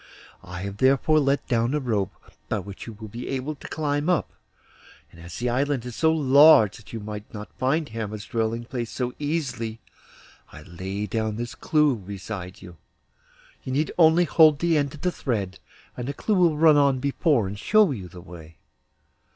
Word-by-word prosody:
I 90 Hz, 0 st, -8 dB
have 100 Hz, +1 st, -6 dB
therefore 135 Hz, +5 st, +3 dB
let 140 Hz, -1 st, 0 dB
down 120 Hz, +3 st, +1 dB
a -, -, +1 dB
rope, 110 Hz, -8 st, -2 dB, 0.3 s
by -, -, 0 dB
which 100 Hz, +2 st, -8 dB
you 115 Hz, -, -7 dB
will 110 Hz, +1 st, -10 dB
be 115 Hz, +4 st, -7 dB
able 135 Hz, +3 st, -3 dB
to 145 Hz, -, -11 dB
climb 150 Hz, +1 st, -1 dB
up; 180 Hz, -, 0 dB, 0.8 s
and 85 Hz, -, -15 dB
as 85 Hz, 0 st, -9 dB
the 120 Hz, -, -2 dB
island 130 Hz, +1 st, 0 dB
is 125 Hz, -2 st, -7 dB
so 160 Hz, -1 st, +3 dB
large 140 Hz, -7 st, +6 dB
that 110 Hz, -, -15 dB
you 115 Hz, -, -5 dB
might 105 Hz, 0 st, -8 dB
not 105 Hz, 0 st, -8 dB
find 150 Hz, +4 st, +1 dB
Hermod's 110 Hz, -2 st, -5 dB
dwelling 115 Hz, +1 st, -2 dB
place 120 Hz, -2 st, -4 dB
so 125 Hz, -1 st, -3 dB
easily, 130 Hz, -7 st, -3 dB, 0.7 s
I 75 Hz, -, -12 dB
lay 95 Hz, +5 st, -5 dB
down 110 Hz, 0 st, -2 dB
this 120 Hz, 0 st, -5 dB
clew 150 Hz, +2 st, +2 dB
beside 95 Hz, -1 st, -8 dB
you. 90 Hz, -2 st, -12 dB, 0.9 s
You 130 Hz, -, -4 dB
need 150 Hz, +3 st, 0 dB
only 165 Hz, +1 st, +5 dB
hold 155 Hz, -2 st, +5 dB
the 170 Hz, +2 st, +1 dB
end 145 Hz, -2 st, +1 dB
of 145 Hz, -, -14 dB
the 180 Hz, -, 0 dB
thread, 100 Hz, -, -3 dB, 0.4 s
and 125 Hz, 0 st, -5 dB
the 140 Hz, -, -4 dB
clew 215 Hz, -, -1 dB
will 175 Hz, -5 st, +3 dB
run 155 Hz, -1 st, +6 dB
on 140 Hz, -2 st, +3 dB
before 140 Hz, -, +1 dB
and 100 Hz, +2 st, -6 dB
show 215 Hz, -, +4 dB
you 100 Hz, -9 st, -5 dB
the 90 Hz, -1 st, -12 dB
way. 85 Hz, -3 st, -13 dB
120 Hz, 190 wpm, -24 LUFS, 105-145 Hz, 0.9 s, large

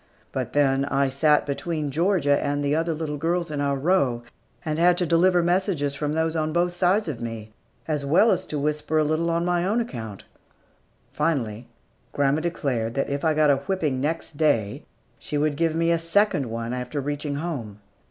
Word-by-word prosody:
But -, -, -4 dB
then, 135 Hz, -1 st, +2 dB
I 140 Hz, -1 st, +1 dB
sat 150 Hz, +3 st, +3 dB
between 150 Hz, +1 st, -3 dB
Georgia 160 Hz, -3 st, +2 dB
and 145 Hz, 0 st, -1 dB
the 145 Hz, +1 st, +1 dB
other 165 Hz, 0 st, 0 dB
little 150 Hz, -2 st, -4 dB
girls 170 Hz, +1 st, -1 dB
in 145 Hz, -1 st, -2 dB
our 140 Hz, -1 st, +1 dB
row, 135 Hz, -6 st, +1 dB, 0.4 s
and 155 Hz, 0 st, -2 dB
had 175 Hz, +1 st, +4 dB
to 180 Hz, -, +1 dB
deliver 175 Hz, +2 st, +3 dB
messages 175 Hz, -5 st, 0 dB
from 150 Hz, +1 st, -2 dB
those 160 Hz, +1 st, 0 dB
on 155 Hz, -1 st, 0 dB
both 175 Hz, +2 st, +1 dB
sides 180 Hz, +4 st, +2 dB
of 135 Hz, -7 st, -4 dB
me, 115 Hz, -2 st, -6 dB, 0.4 s
as 150 Hz, -3 st, -1 dB
well 170 Hz, +11 st, +4 dB
as 185 Hz, 0 st, -1 dB
to 150 Hz, -, -3 dB
whisper 150 Hz, +2 st, -1 dB
a 155 Hz, -, +4 dB
little 155 Hz, +3 st, 0 dB
on 170 Hz, +1 st, 0 dB
my 175 Hz, -1 st, +1 dB
own 210 Hz, +6 st, +1 dB
account. 115 Hz, -, -6 dB, 0.9 s
Finally, 125 Hz, -8 st, -1 dB, 0.5 s
grandma 145 Hz, +2 st, +1 dB
declared 130 Hz, -9 st, -2 dB
that 135 Hz, -, -1 dB
if 140 Hz, 0 st, -2 dB
I 160 Hz, -2 st, +2 dB
got 150 Hz, -1 st, +4 dB
a 140 Hz, -, +3 dB
whipping 145 Hz, -3 st, -2 dB
next 155 Hz, 0 st, -3 dB
day, 115 Hz, -10 st, +1 dB, 0.3 s
she 150 Hz, -, -4 dB
would 150 Hz, 0 st, +1 dB
give 165 Hz, +1 st, 0 dB
me 165 Hz, +1 st, +2 dB
a 170 Hz, -, +2 dB
second 165 Hz, -, +1 dB
one 115 Hz, +1 st, -4 dB
after 125 Hz, +3 st, -4 dB
reaching 145 Hz, +1 st, -3 dB
home. 140 Hz, -10 st, -4 dB
150 Hz, 190 wpm, -24 LUFS, 140-170 Hz, 0.9 s, had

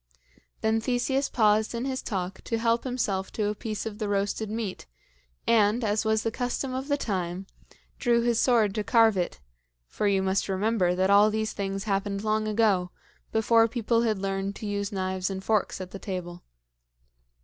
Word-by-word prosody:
Then 220 Hz, 0 st, +1 dB
Theseus 260 Hz, +3 st, 0 dB
paused 215 Hz, 0 st, +2 dB
in 235 Hz, +2 st, -2 dB
his 260 Hz, -1 st, -2 dB
talk 190 Hz, -2 st, -4 dB
to 230 Hz, -, -1 dB
help 230 Hz, +2 st, +1 dB
himself 205 Hz, -7 st, -2 dB
to 210 Hz, -2 st, 0 dB
a -, -, -1 dB
piece 215 Hz, +1 st, -5 dB
of 215 Hz, -1 st, -6 dB
the 210 Hz, -2 st, -2 dB
roasted 205 Hz, +2 st, -1 dB
meat, 215 Hz, -, -4 dB, 0.6 s
and, 225 Hz, +1 st, +3 dB
as 210 Hz, 0 st, +1 dB
was 220 Hz, 0 st, +1 dB
the 225 Hz, -, 0 dB
custom 250 Hz, +2 st, -2 dB
of 260 Hz, +2 st, -3 dB
the 285 Hz, -1 st, +1 dB
time, 185 Hz, -6 st, -3 dB, 0.5 s
drew 235 Hz, -2 st, +2 dB
his 235 Hz, -1 st, +2 dB
sword 225 Hz, -6 st, +3 dB
to 215 Hz, 0 st, -2 dB
carve 225 Hz, -1 st, +4 dB
it 180 Hz, -2 st, -2 dB, 0.5 s
for 205 Hz, -, -2 dB
you 195 Hz, -1 st, +2 dB
must 190 Hz, +1 st, 0 dB
remember 190 Hz, -2 st, +1 dB
that 190 Hz, +2 st, +2 dB
all 205 Hz, +1 st, +6 dB
these 220 Hz, 0 st, -2 dB
things 195 Hz, -1 st, -3 dB
happened 200 Hz, -1 st, -1 dB
long 215 Hz, 0 st, 0 dB
ago, 210 Hz, -4 st, +2 dB, 0.4 s
before 225 Hz, +1 st, +4 dB
people 230 Hz, 0 st, 0 dB
had 220 Hz, -3 st, +1 dB
learned 195 Hz, 0 st, -2 dB
to -, -, -7 dB
use 200 Hz, 0 st, -2 dB
knives 185 Hz, -1 st, -2 dB
and 190 Hz, -1 st, -5 dB
forks 215 Hz, -2 st, 0 dB
at 185 Hz, -1 st, -7 dB
the 195 Hz, -, -7 dB
table. 180 Hz, -3 st, -5 dB
215 Hz, 180 wpm, -27 LUFS, 195-230 Hz, 0.6 s, all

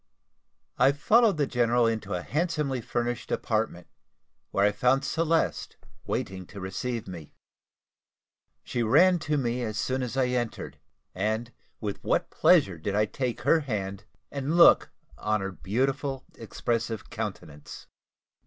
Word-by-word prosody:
I 140 Hz, -, +5 dB
followed 215 Hz, +6 st, +4 dB
the 145 Hz, -, +2 dB
general 120 Hz, -2 st, +2 dB
into 110 Hz, -4 st, -1 dB
a 90 Hz, -, -4 dB
handsomely 150 Hz, -5 st, -1 dB
furnished 120 Hz, +1 st, -3 dB
apartment, 110 Hz, -6 st, -1 dB, 0.6 s
where 100 Hz, -, +2 dB
I 105 Hz, -, +4 dB
found 125 Hz, +6 st, +2 dB
Celeste 165 Hz, +1 st, 0 dB, 0.3 s
waiting 95 Hz, -1 st, -3 dB
to 100 Hz, -, -10 dB
receive 100 Hz, +5 st, -4 dB
me. 85 Hz, -5 st, -9 dB, 1.3 s
She 120 Hz, -, -2 dB
ran 170 Hz, +11 st, +5 dB
to 150 Hz, -1 st, -1 dB
me 125 Hz, -2 st, -1 dB
as 110 Hz, -3 st, -3 dB
soon 130 Hz, +4 st, -1 dB
as 125 Hz, +1 st, -4 dB
I 130 Hz, -2 st, +2 dB
entered; 120 Hz, -2 st, -3 dB, 0.3 s
and 110 Hz, +5 st, -2 dB, 0.3 s
with 105 Hz, -3 st, -5 dB
what -, -, 0 dB
pleasure 90 Hz, -4 st, +4 dB
did 100 Hz, +5 st, -2 dB
I 105 Hz, +1 st, +3 dB
take 125 Hz, +2 st, -3 dB
her 165 Hz, -, +4 dB
hand, 100 Hz, -8 st, -4 dB, 0.3 s
and 140 Hz, +4 st, -2 dB
look 170 Hz, -, +7 dB, 0.3 s
on 105 Hz, 0 st, 0 dB
her 95 Hz, 0 st, -4 dB
beautiful, 135 Hz, -, -2 dB
expressive 115 Hz, -1 st, -3 dB
countenance! 95 Hz, -10 st, -7 dB
120 Hz, 135 wpm, -27 LUFS, 105-135 Hz, 1.3 s, look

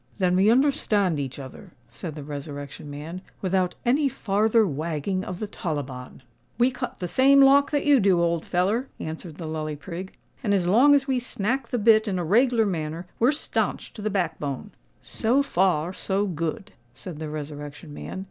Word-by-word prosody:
"Then 180 Hz, -2 st, +2 dB
we 195 Hz, +3 st, +4 dB
understand 225 Hz, -, +2 dB
each 135 Hz, -2 st, -4 dB
other," 145 Hz, +7 st, -10 dB, 0.2 s
said 160 Hz, -4 st, -7 dB
the 150 Hz, -, -7 dB
Resurrection 145 Hz, 0 st, -7 dB
Man, 155 Hz, +5 st, -7 dB, 0.2 s
"without 185 Hz, -1 st, 0 dB
any 275 Hz, +4 st, +3 dB
farther 220 Hz, 0 st, +2 dB
wagging 160 Hz, +3 st, -2 dB
of 185 Hz, -, -5 dB
the 215 Hz, -, -3 dB
tollibon." 140 Hz, -10 st, -5 dB, 0.3 s
"We 245 Hz, +2 st, +3 dB
cut 250 Hz, 0 st, -5 dB
the 180 Hz, -, -4 dB
same 275 Hz, +8 st, +5 dB
lock 275 Hz, +1 st, +6 dB
that 290 Hz, -2 st, 0 dB
you 290 Hz, -2 st, +6 dB
do, 190 Hz, -4 st, +3 dB
old 170 Hz, -1 st, +1 dB
feller," 205 Hz, +9 st, 0 dB
answered 160 Hz, 0 st, -6 dB
the 165 Hz, -, -7 dB
Lully 155 Hz, -1 st, -3 dB
Prig; 180 Hz, +5 st, -7 dB, 0.3 s
"and 205 Hz, -4 st, +2 dB
as 185 Hz, -3 st, +1 dB
long 250 Hz, +11 st, +6 dB
as 275 Hz, -1 st, +2 dB
we 260 Hz, -2 st, +1 dB
snack 245 Hz, +1 st, -2 dB
the 245 Hz, -, -2 dB
bit 220 Hz, 0 st, +5 dB
in 190 Hz, -3 st, -1 dB
a 175 Hz, -, -2 dB
reg'lar 230 Hz, +5 st, +3 dB
manner, 165 Hz, -2 st, -3 dB
we're 240 Hz, +4 st, +5 dB
stanch 300 Hz, -, -2 dB
to 215 Hz, -, -9 dB
the 215 Hz, -, -1 dB
back 185 Hz, -5 st, -1 dB
bone." 145 Hz, +8 st, -4 dB, 0.3 s
"So 250 Hz, +5 st, +1 dB
far, 180 Hz, -, +1 dB
so 195 Hz, +2 st, -1 dB
good," 185 Hz, +4 st, -4 dB, 0.2 s
said 150 Hz, +5 st, -8 dB
the 155 Hz, -1 st, -5 dB
Resurrection 145 Hz, 0 st, -7 dB
Man. 190 Hz, -, -7 dB
185 Hz, 185 wpm, -25 LUFS, 155-230 Hz, 0.3 s, lock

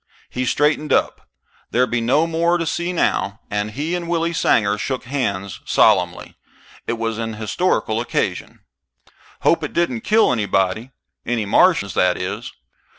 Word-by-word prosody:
He 130 Hz, +1 st, -2 dB
straightened 150 Hz, +4 st, +1 dB
up -, -, 0 dB, 0.4 s
there'd 125 Hz, +1 st, +1 dB
be 120 Hz, -1 st, 0 dB
no 135 Hz, +8 st, +3 dB
more 170 Hz, +1 st, +1 dB
to 165 Hz, -, -2 dB
see 170 Hz, +2 st, -2 dB
now 110 Hz, -, 0 dB
and 105 Hz, +1 st, -1 dB
he 150 Hz, +9 st, -3 dB
and 175 Hz, -1 st, -3 dB
Willie 170 Hz, 0 st, 0 dB
Sanger 105 Hz, -10 st, +2 dB
shook 130 Hz, +3 st, -3 dB
hands 100 Hz, -8 st, -3 dB
solemnly. -, -, +2 dB, 0.5 s
It -, -, 0 dB
was 115 Hz, -1 st, -3 dB
an 115 Hz, -1 st, -3 dB
historical 110 Hz, -, 0 dB
occasion. 120 Hz, -, -3 dB, 0.8 s
"Hope -, -, +2 dB
it -, -, -4 dB
didn't 130 Hz, -10 st, 0 dB
kill 220 Hz, +1 st, +3 dB
anybody. 100 Hz, +1 st, 0 dB, 0.3 s
Any 115 Hz, -2 st, -1 dB
Martians, 100 Hz, -, +3 dB
that 90 Hz, -1 st, +2 dB
is. 100 Hz, +6 st, -4 dB
120 Hz, 150 wpm, -20 LUFS, 105-165 Hz, 0.8 s, no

